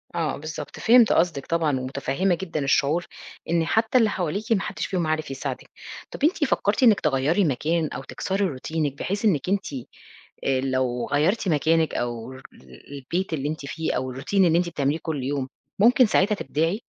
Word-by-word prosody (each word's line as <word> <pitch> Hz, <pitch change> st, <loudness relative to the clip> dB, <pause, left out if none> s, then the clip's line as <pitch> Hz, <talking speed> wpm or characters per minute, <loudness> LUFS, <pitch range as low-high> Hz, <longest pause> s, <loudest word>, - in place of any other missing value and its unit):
آه 160 Hz, -4 st, -1 dB
بالضبط، 155 Hz, +1 st, -7 dB
فهمت 235 Hz, 0 st, +6 dB
قصدِك 165 Hz, -5 st, +1 dB
طبعًا، 160 Hz, -5 st, 0 dB
ومتفهمة 140 Hz, +8 st, -1 dB
جدًا 170 Hz, -3 st, -4 dB
الشعور 140 Hz, +5 st, +2 dB, 0.4 s
إن 165 Hz, -1 st, +2 dB
حتى 220 Hz, +7 st, +2 dB
اللي 225 Hz, -3 st, +4 dB
حواليكِ 195 Hz, +5 st, -3 dB
ما 210 Hz, -4 st, +3 dB
حدش 205 Hz, -1 st, -4 dB
فيهم 175 Hz, -4 st, -1 dB
عارف 155 Hz, -3 st, -2 dB
يساعدِك، 135 Hz, -, -5 dB, 0.4 s
طَب -, -, -8 dB
أنتِ 315 Hz, 0 st, +2 dB
فكرتِ 210 Hz, -2 st, +1 dB
إنِّك 220 Hz, -4 st, +6 dB
تغيري 150 Hz, +7 st, +1 dB
مكان 155 Hz, +3 st, 0 dB
أو 135 Hz, -, -6 dB
تكسري 190 Hz, +10 st, -2 dB
روتينِك 150 Hz, -1 st, -2 dB
بحيث 200 Hz, +3 st, -2 dB
إنِّك 180 Hz, -4 st, +1 dB
أنتِ 195 Hz, -6 st, -1 dB, 0.7 s
آآ 130 Hz, -1 st, +1 dB
لو 130 Hz, -2 st, -1 dB
غيرتِ 175 Hz, +9 st, +1 dB
مكانِك، 160 Hz, +1 st, +2 dB
أو 120 Hz, +1 st, -3 dB, 0.6 s
البيت 165 Hz, +6 st, -3 dB
اللي 145 Hz, -1 st, -2 dB
أنتِ 155 Hz, -2 st, -5 dB
فيه، 160 Hz, +3 st, -3 dB
أو 130 Hz, 0 st, -3 dB
الroutine 135 Hz, +9 st, -8 dB
اللي 165 Hz, -1 st, +3 dB
أنتِ 175 Hz, -, -1 dB
بتعمليه 145 Hz, -1 st, -1 dB
كل 155 Hz, -5 st, -3 dB
يوم، 135 Hz, 0 st, -2 dB, 0.3 s
ممكن 245 Hz, +4 st, +6 dB
ساعتها 210 Hz, 0 st, +2 dB
تبدعي؟ 170 Hz, +3 st, -1 dB
160 Hz, 170 wpm, -24 LUFS, 140-190 Hz, 0.7 s, فهمت